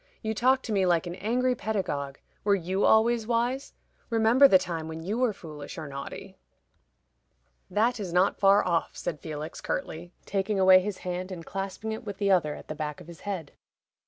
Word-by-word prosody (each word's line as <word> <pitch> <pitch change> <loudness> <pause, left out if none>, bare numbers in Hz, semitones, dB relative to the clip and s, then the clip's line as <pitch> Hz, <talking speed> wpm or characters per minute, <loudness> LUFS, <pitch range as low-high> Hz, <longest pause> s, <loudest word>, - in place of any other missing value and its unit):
"You 220 0 -1
talk 260 +4 +3
to 225 - -5
me 195 -2 +2
like 175 -1 +2
an 175 - -5
angry 245 +7 0
pedagogue. 165 - -3 0.3
Were 200 -1 +4
you 190 +2 0
always 225 0 +4
wise? 245 +3 -1 0.3
Remember 230 +4 +6
the 190 - +7
time 170 -3 -4
when 160 0 -6
you 210 +7 -2
were 250 -3 +3
foolish 155 -7 -9
or 160 -2 -5
naughty." 140 0 -8 1.3
"That 225 +5 +1
is 190 -4 -4
not 180 +3 +2
far 200 0 +5
off," 170 -2 0
said 165 -4 -4
Felix, 155 +1 -6
curtly, 175 +2 -4
taking 195 +1 -1
away 185 0 +8
his 195 0 -4
hand, 180 +1 -3
and 170 -3 -7
clasping 195 +3 -4
it 220 - -5
with 205 -3 -6
the 200 -1 +1
other 160 -6 +2
at - - -12
the - - -4
back 150 -1 -5
of - - -12
his 170 0 -12
head. 185 -8 -5
190 Hz, 190 wpm, -27 LUFS, 170-220 Hz, 1.3 s, away